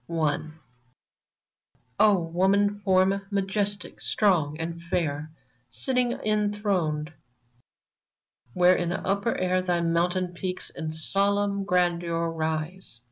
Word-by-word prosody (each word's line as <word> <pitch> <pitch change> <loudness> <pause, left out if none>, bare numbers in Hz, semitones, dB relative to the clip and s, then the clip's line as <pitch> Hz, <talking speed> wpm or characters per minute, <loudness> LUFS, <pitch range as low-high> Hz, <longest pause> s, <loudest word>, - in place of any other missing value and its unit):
0 155 -1 -1 1.4
WOMAN 200 +2 +3
FORM, 190 0 +2
majestic, 200 0 -2
strong 165 -8 +1
and 165 +1 -4
fair, 155 -3 -2 0.4
Sitting 250 - 0
enthroned 205 -7 -1 1.4
where 180 0 +5
in 175 -1 -1
upper 200 +4 -1
air 185 0 +1
Thy 175 -2 0
mountain 175 +2 0
peaks 180 +1 -4
in 160 -1 -5
solemn 200 +4 +1
grandeur 170 -2 +1
rise. 160 -3 -4
180 Hz, 90 wpm, -26 LUFS, 165-200 Hz, 1.4 s, where